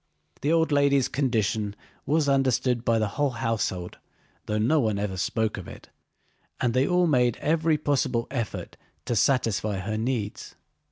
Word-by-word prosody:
The 145 - +1
old 165 -1 +2
lady's 140 -2 +3
condition 110 -6 -1 0.3
was 150 +1 +2
understood 130 -3 +2
by 115 -1 +2
the 110 -1 +1
whole 145 +7 0
household 110 -7 -2 0.5
though 105 - -1
no 125 +9 +3
one 110 -6 +1
ever 100 -2 -2
spoke 105 +6 -1
of 95 - -8
it, - - -12 0.7
and 120 -2 +1
they 130 +2 +2
all 180 0 +3
made 125 -7 +2
every 160 0 +1
possible 130 -5 0
effort 120 -6 -4 0.3
to 120 - -1
satisfy 110 -3 +1
her 110 +3 -3
needs. 115 -3 -3
120 Hz, 155 wpm, -26 LUFS, 110-140 Hz, 0.7 s, lady's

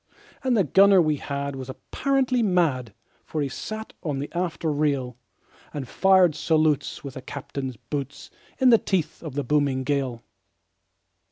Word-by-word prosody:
And 255 -3 +2
the 200 - +4
gunner 195 +4 +6
we 155 -3 +2
had 140 0 -4
was 130 -1 -7
apparently 260 - 0
mad, 160 - +1 0.3
For 155 - -4
he 140 -2 0
sat 215 - -6
on 150 -5 -2
the 140 +2 -5
after 170 -2 -1
rail, 140 -4 0 0.6
And 140 -3 -4
fired 190 -1 +4
salutes 155 -2 +1
with 140 -2 -7
the 130 - -7
captain's 135 -2 -6
boots, 140 +4 -6 0.3
In 260 -1 +5
the 230 - +7
teeth 170 -5 -2
of 155 -5 -7
the 145 - -1
booming 140 -1 +1
gale. 130 -4 -1
150 Hz, 155 wpm, -25 LUFS, 135-185 Hz, 0.6 s, the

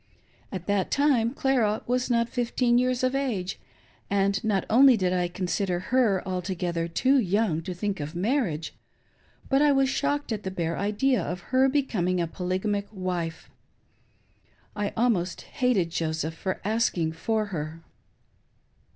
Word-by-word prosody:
At 185 -3 -5
that 200 -2 0
time 275 -6 +3
Clara 250 -6 +1
was 250 +1 0
not 235 -1 +2
fifteen 240 0 +1
years 255 0 0
of 255 0 +2
age, 225 -10 -2 0.5
and 200 0 +1
not 205 -3 +1
only 255 +2 +6
did 185 -2 +1
I 180 -1 +1
consider 180 +1 -1 0.2
her 215 -7 +3
altogether 180 -2 -2
two 260 +11 +3
young 200 -5 +1
to 180 +2 -6
think 200 +1 -2
of 150 +3 -5
marriage, 185 - -1 0.7
but 270 +1 +3
I 295 -1 +5
was 270 -1 +3
shocked 285 0 -1
at 215 -2 -2
the 190 - -4
bare 170 -3 -2
idea 215 +6 +1
of 175 0 -4
her 260 +1 +5
becoming 205 -11 0
a 170 - +1
polyga 185 +3 -3
mic 205 -1 -1
wife. 180 -4 -4 1.2
I 205 -1 -1
almost 195 -7 +1
hated 240 - 0
Joseph 160 -1 -2
for 185 +3 -3
asking 205 -7 +1
for 215 +7 -1
her. 160 +1 -5
200 Hz, 150 wpm, -26 LUFS, 180-250 Hz, 1.2 s, only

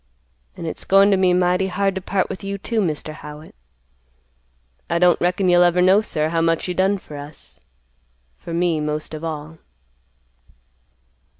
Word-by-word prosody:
An' - - -6
it's 160 - -5
goin 195 +1 +5
to - - +5
be 185 -1 +3
mighty 180 +1 +2
hard 195 +1 0
to 190 - -4
part 190 0 -1
with 195 - -7
you, 200 0 -4
too, 225 +3 -2
Mr. 155 -3 -3
Howitt. 150 0 -11 1.4
I 170 - +1
don't 175 0 +3
reckon 180 +2 +1
you'll 175 0 +5
ever 175 0 +4
know, 190 +3 +5
sir, 155 -7 -2
how 165 0 0
much 165 +1 +1
you 180 - -2
done 190 +3 +1
for 150 -5 -11
us; 145 - -10 0.8
for - - -9
me 170 -1 +1
most 150 +1 -3
of 155 +1 -7
all." 160 0 -6
175 Hz, 170 wpm, -21 LUFS, 155-190 Hz, 1.4 s, goin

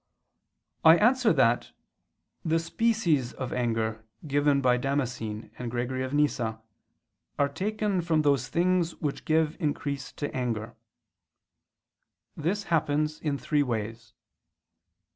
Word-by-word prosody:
]. - - -51
I - - +5
answer 245 +2 +4
that, 120 -6 +2 0.7
The 165 0 +2
species 165 - +1
of 130 -2 -5
anger 115 -2 -1 0.2
given 145 -1 +2
by 125 -2 +3
Damascene 125 -5 -3
and 125 -1 -3
Gregory 125 +2 -2
of 130 0 -3
Nyssa 130 -7 0 0.8
are 140 - +3
taken 200 +4 -1
from 160 -2 +1
those 140 -4 +2
things 175 +2 +1
which 145 -2 -4
give 160 0 +2
increase 145 -4 -2
to 145 - -5
anger. 115 -3 -3 1.6
This 185 +7 -1
happens 155 -3 0
in 145 -3 -1
three 145 +1 +1
ways. 115 -3 -3
145 Hz, 120 wpm, -28 LUFS, 120-165 Hz, 1.6 s, I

